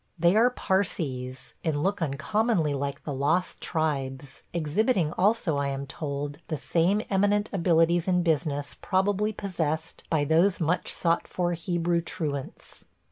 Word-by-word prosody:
They 170 +3 +4
are 230 +3 +6
Parsees, 140 - -2
and 150 -2 0
look 200 0 0
uncommonly 165 - +1
like 140 0 -3
the 145 - -4
lost 155 +7 0
tribes 140 -4 -2
– - - -41
exhibiting 170 - +1
also, 195 -6 +2
I 140 0 0
am 140 0 -3
told, 145 +1 -4
the 155 - -2
same 180 +8 +1
eminent 205 +2 +2
abilities 170 -1 +3
in 180 -1 +2
business 150 -3 0
probably 205 +2 +1
possessed 165 -6 -3
by 150 -3 +2
those 170 +6 +3
much 170 +2 0
sought 170 -1 0
for 175 -1 -1
Hebrew 170 0 0
truants. 145 -5 -5
165 Hz, 140 wpm, -27 LUFS, 145-190 Hz, -, are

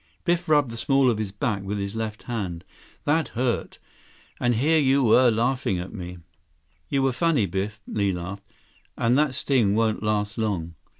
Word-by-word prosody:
Biff 175 -1 0
rubbed 145 -5 +3
the 115 - -6
small 135 +1 +3
of 110 - -2
his 105 -3 -3
back 105 -2 -2
with 100 +2 -3
his 100 +1 -4
left 110 -1 -4
hand. 95 -8 -4 0.4
"That 160 +2 +1
hurt. 125 -1 -1 0.6
And 120 -1 +2
here 155 +7 +3
you 135 -5 +4
are 125 -1 +6
laughing 115 -3 0
at 90 +1 -6
me." 90 -3 -7 0.7
"You 135 -1 +1
were 135 - +3
funny, 150 - +2
Biff," 100 +4 -3
Li 100 -2 0
laughed. 90 +2 -5 0.6
"And 120 +2 +2
that 150 -4 +1
sting 120 -8 +2
won't 110 -1 +1
last 105 +1 -1
long." 90 -7 -2
115 Hz, 175 wpm, -25 LUFS, 100-135 Hz, 0.7 s, are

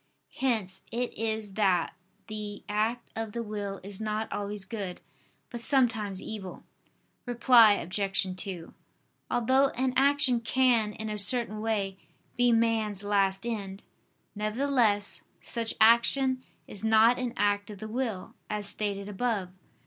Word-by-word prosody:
Hence 215 -8 0
it 245 +1 -2
is 220 -2 -2
that 190 -5 +2 0.3
the 210 -1 -6
act 220 +3 -1
of 225 -2 -4
the 235 - -3
will 205 -2 -5
is 200 +1 -7
not 215 0 -2
always 205 -1 -4
good, 195 -4 -5 0.5
but 240 -2 -6
sometimes 225 -7 +2
evil. 195 -4 -7 0.6
Reply 235 -2 +6
Obj. 195 0 -1
2: 185 -3 -5 0.6
Although 260 +3 +3
an 255 +1 0
action 275 -2 +4
can, 235 -3 +2
in 220 0 -6
a 210 - -3
certain 215 -1 +1
way, 200 -4 -1 0.4
be 245 0 +3
man's 225 -3 +1
last 195 0 +1
end; 200 -4 -4 0.5
nevertheless 215 -1 +1 0.2
such 230 -1 -2
action 255 +4 +4 0.3
is 205 - -6
not 220 +2 +5
an 250 -2 -3
act 205 0 +1
of 210 - -8
the 215 - -7
will, 225 -4 -3 0.2
as 210 -1 -2
stated 200 -1 -3
above 205 -2 -2
(Q. 185 - -25
215 Hz, 135 wpm, -28 LUFS, 200-235 Hz, 0.6 s, Reply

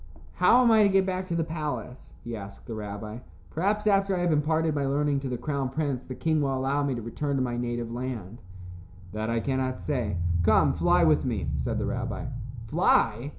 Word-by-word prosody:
"How 250 +2 +6
am 235 - +5
I 220 -1 +6
to 205 - +5
get 195 -1 +3
back 185 0 -2
to 170 - -2
the 165 - +1
palace?" 150 -6 -5
he 120 -1 -5
asked 100 -2 -9
the 115 - -6
rabbi. 105 +1 -6 0.3
"Perhaps 205 +6 0
after 195 -2 +3
I - - -1
have 175 -1 +2
imparted 155 +1 +1
my 145 -1 0
learning 140 +1 +1
to 135 -1 -4
the 125 - -2
crown 135 +1 -2
prince, 140 -2 -2
the 130 - -7
king 155 +1 +1
will 135 -2 0
allow 135 +2 0
me 140 -2 0
to 120 - -4
return 140 +5 -2
to 135 - +1
my 120 -1 -2
native 120 -1 -3
land." 120 -4 -5 0.7
"That 110 +1 -3
I 115 0 +1
cannot 130 +1 -1
say. 120 -10 -2 0.2
Come, 85 - +4
fly - - +3
with - - +4
me," - - -2
said - - -2
the - - -1
rabbi. - - -3 0.4
"Fly!" 120 - +2
135 Hz, 210 wpm, -27 LUFS, 120-160 Hz, 0.7 s, How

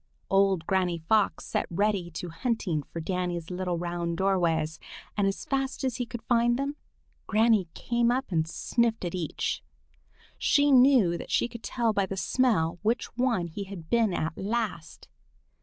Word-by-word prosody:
Old 195 -3 +3
Granny 185 -2 +1
Fox 200 +6 +1
set - - -1
Reddy 195 0 0
to 175 +1 -6
hunting 175 - -1
for 165 - -8
Danny's 175 0 -3
little 180 -1 -2
round 170 -1 -3
doorways, 165 -5 +1 0.4
and 205 -1 +2
as 195 - -3
fast 270 -1 -2
as 255 -3 -1
he 245 -2 -3 0.2
found 240 0 +3
them, 280 +2 -2 0.5
Granny 220 -3 +3
came 235 0 +1
up 255 -2 -1
and 160 -2 +1
sniffed 230 +4 0
at 175 - -3
each. 170 -5 -2 0.8
She 285 0 +4
knew 250 -10 +5
that - - -8
she - - +2
could 235 -1 -10
tell 235 -2 0
by 200 -2 +1
the 195 - -5
smell 190 -8 +1
which 225 +4 -1
one 240 -7 +1
he 185 +4 -6
had 185 -5 -10
been 230 -3 +3
at 165 -2 -2
last. 205 -6 -3
195 Hz, 160 wpm, -28 LUFS, 170-235 Hz, 0.8 s, knew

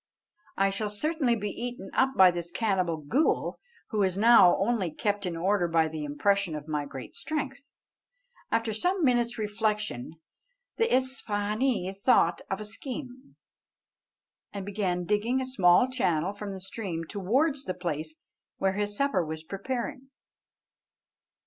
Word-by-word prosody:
I 195 0 +3
shall 210 +2 -2
certainly 270 +3 +1
be 210 -2 -3
eaten 240 -4 -6
up 265 0 +2
by 185 -1 +8
this 170 -1 -2
cannibal 185 -5 0
ghool, 270 - +1 0.3
who 215 -2 +1
is 190 -1 +1
now 220 -4 +7
only 200 -3 0
kept 200 +4 -2
in 170 -2 -3
order 185 +1 +1
by 165 -1 +2
the 155 -1 -5
impression 170 +4 +1
of 150 0 -7
my 150 -2 -2
great 135 -5 -9
strength." 280 +4 -4 0.8
After 225 -1 0
some 355 - 0
minutes' 240 -2 +2
reflection 210 - -2 0.6
the 455 - +3
Isfahânee 220 -4 0
thought 190 -5 +3
of 195 - -2
a 215 - -5
scheme, 255 +4 -7 1.2
and 200 -2 -6
began 190 -3 -1
digging 210 +6 +1
a 260 - -2
small 215 -2 +4
channel 185 -8 0
from 205 0 -6
the 190 - -6
stream 185 -3 -4
towards 265 - 0
the 185 - -3
place 155 -3 -4 0.4
where 190 0 +1
his 205 +1 -2
supper 275 -11 +1
was 160 0 -6
preparing. 245 +8 -5
205 Hz, 145 wpm, -28 LUFS, 180-245 Hz, 1.2 s, by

